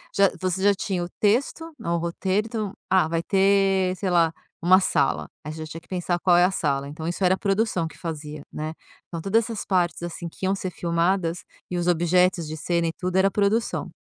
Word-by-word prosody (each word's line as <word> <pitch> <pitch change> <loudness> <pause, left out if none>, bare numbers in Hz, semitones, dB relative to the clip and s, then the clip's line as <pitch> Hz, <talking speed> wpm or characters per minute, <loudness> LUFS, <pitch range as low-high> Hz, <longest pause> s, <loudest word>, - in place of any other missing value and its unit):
já 200 -1 +5
você 185 +1 -1
já 205 0 +5
tinha 190 -2 -2
o 175 - -6
texto, 265 +10 +1
o 170 -6 -1
roteiro, 185 +5 -1
então: 215 -4 -3 0.2
"Ah, 185 -4 +4
vai 165 0 -1
ter, 195 0 +3
sei 190 0 -2
lá, 170 -2 +3 0.3
uma 185 +2 +6
sala", 140 -7 +1 0.2
aí, 150 - -5
já 160 0 -6
tinha 160 +1 -8
que - - -26
pensar 175 -1 -1
qual 175 0 +4
é 175 - +6
a 185 - +1
sala, 140 -6 -1
então 160 +3 -6
isso 175 +3 -2
era 185 0 +4
a - - -13
produção 195 -4 0
que - - -13
fazia, 150 -3 -6
né? 155 +1 -4 0.3
Então 165 -2 -6
todas 215 +6 +2
essas 225 -1 -5
partes, 175 -4 +1
assim, 170 0 -5
que 190 - -6
iam 190 +1 +2
ser 185 -1 -4
filmadas 170 +1 0 0.3
e 180 - -2
os 175 0 -1
objetos 175 0 +2
de 155 +1 -5
cena 170 +2 0
e 165 - -2
tudo 185 0 -1
era 190 +1 +4
produção 210 +3 0
180 Hz, 220 wpm, -24 LUFS, 170-195 Hz, 0.3 s, uma